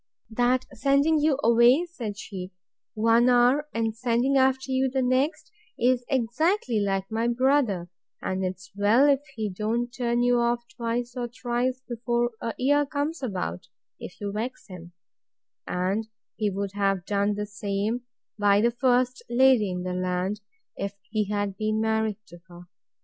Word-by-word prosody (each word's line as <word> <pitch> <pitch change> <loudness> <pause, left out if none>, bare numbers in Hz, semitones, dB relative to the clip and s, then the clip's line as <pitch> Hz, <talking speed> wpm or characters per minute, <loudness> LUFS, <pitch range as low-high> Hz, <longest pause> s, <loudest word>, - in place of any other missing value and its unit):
That 245 +3 +1
sending 280 +5 +3
you 295 -2 +2
away, 235 +7 +5
said 235 -12 -6
she, 190 -3 -7 0.4
one 230 +3 +4
hour, 250 +4 +4
and 225 -1 -1
sending 245 +3 +1
after 265 0 +2
you 260 0 +2
the 265 0 0
next, 255 +5 0 0.3
is 245 0 +2
exactly 260 - +1
like 195 -1 -1
my 225 +1 0
brother; 240 -7 +1 0.3
and 190 0 -3
'tis 185 0 -5
well 215 +7 +4
if 280 -2 +4 0.2
he 220 -2 -2
don't 225 +5 -2
turn 240 -1 0
you 245 0 +3
off 235 0 +1
twice 240 +1 -3
or 245 -1 -2
thrice 250 +1 -2
before 240 0 -1
a 230 - -3
year 290 +3 +3
comes 295 +3 -3
about, 185 - -4 0.3
if - - -9
you 205 -1 -3
vex 225 +5 -4
him: 175 -3 -11 0.7
and 190 +5 -1 0.3
he 210 -1 0
would 200 0 -3
have 195 -3 0
done 205 +1 0
the 210 0 -3
same 205 +3 -2 0.4
by 205 -1 +4
the 235 +3 +3
first 250 +1 +1
lady 245 -4 +4
in 180 0 -4
the 180 0 -3
land, 185 +3 -2 0.3
if 200 0 -4 0.2
he 210 -2 0
had 205 -2 -1
been 215 0 0
married 220 -1 0
to 175 - -14
her. 175 -1 -13
235 Hz, 160 wpm, -26 LUFS, 205-255 Hz, 0.7 s, away